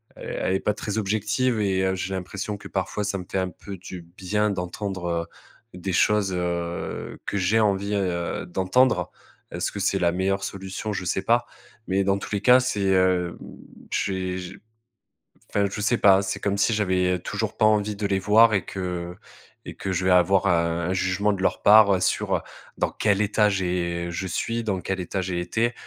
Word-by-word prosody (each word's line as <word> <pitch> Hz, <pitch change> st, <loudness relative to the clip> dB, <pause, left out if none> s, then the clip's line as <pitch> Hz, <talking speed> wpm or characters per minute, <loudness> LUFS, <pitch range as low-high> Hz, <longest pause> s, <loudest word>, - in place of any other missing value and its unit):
elle 95 Hz, -, -3 dB
est -, -, +1 dB
pas 105 Hz, -, +1 dB
très 105 Hz, 0 st, -4 dB
objective. 110 Hz, +4 st, 0 dB
Et 95 Hz, -2 st, +1 dB
heu, 95 Hz, -, +1 dB
j'ai 95 Hz, +1 st, -4 dB
l'impression 100 Hz, +3 st, -4 dB
que, -, -, -10 dB
parfois, 95 Hz, +2 st, -2 dB
ça 100 Hz, -1 st, -1 dB
me 90 Hz, -, -8 dB
fait 95 Hz, -, 0 dB
un 95 Hz, -1 st, -1 dB
peu 100 Hz, +1 st, -9 dB
du 90 Hz, 0 st, -9 dB
bien 95 Hz, +5 st, -1 dB
d'entendre, 95 Hz, 0 st, -4 dB, 0.7 s
heu, 90 Hz, -, -9 dB
des 95 Hz, 0 st, -3 dB
choses, 100 Hz, +1 st, +3 dB
heu, 85 Hz, -1 st, -3 dB
que 100 Hz, -, -2 dB
j'ai 100 Hz, +4 st, +2 dB
envie, 100 Hz, -1 st, +1 dB
heu, 90 Hz, -3 st, -2 dB
d'entendre. 95 Hz, +8 st, +2 dB, 0.4 s
Est-ce -, -, -2 dB
que -, -, -6 dB
c'est -, -, +1 dB
la 85 Hz, -1 st, +2 dB
meilleure 95 Hz, +2 st, -1 dB
solution? 95 Hz, +2 st, -5 dB
Je 95 Hz, -1 st, -4 dB
sais 95 Hz, -, 0 dB
pas. 120 Hz, +4 st, +2 dB, 0.4 s
Mais 95 Hz, +1 st, +1 dB
dans 100 Hz, +1 st, +1 dB
tous -, -, -8 dB
les 100 Hz, -, 0 dB
cas, 125 Hz, +4 st, +7 dB
c'est, 125 Hz, -5 st, -1 dB
heu 95 Hz, -2 st, +2 dB, 0.5 s
j'ai 95 Hz, -1 st, -2 dB, 0.9 s
enfin, 100 Hz, -1 st, +2 dB
je 105 Hz, -, -5 dB
sais 105 Hz, +4 st, +2 dB
pas. 95 Hz, -2 st, +6 dB
C'est 100 Hz, +1 st, -3 dB
comme 100 Hz, 0 st, -1 dB
si 110 Hz, +3 st, +2 dB
j'avais 90 Hz, -3 st, +1 dB
toujours -, -, -3 dB
pas 110 Hz, -, +4 dB
envie 105 Hz, -1 st, +2 dB
de 100 Hz, -, -5 dB
les 95 Hz, -1 st, +1 dB
voir 110 Hz, +4 st, +5 dB
et 95 Hz, -, +1 dB
que 90 Hz, -2 st, -4 dB, 0.5 s
et -, -, -8 dB
que 95 Hz, -, -3 dB
je 90 Hz, +1 st, -1 dB
vais 95 Hz, -, +3 dB
avoir 95 Hz, +2 st, +4 dB
un 85 Hz, 0 st, +1 dB
jugement 95 Hz, +3 st, +1 dB
de 100 Hz, -, -4 dB
leur -, -, 0 dB
part 100 Hz, -3 st, +6 dB
sur -, -, 0 dB, 0.4 s
dans -, -, +1 dB
quel 105 Hz, -1 st, +1 dB
état 105 Hz, 0 st, +3 dB
j'ai 90 Hz, -2 st, -1 dB
je 95 Hz, +3 st, -4 dB
suis, 115 Hz, +6 st, -2 dB
dans 95 Hz, -4 st, -1 dB
quel 95 Hz, +1 st, -3 dB
état 95 Hz, +2 st, -3 dB
j'ai 90 Hz, -1 st, -3 dB
été 110 Hz, +7 st, 0 dB
95 Hz, 195 wpm, -24 LUFS, 90-105 Hz, 0.9 s, cas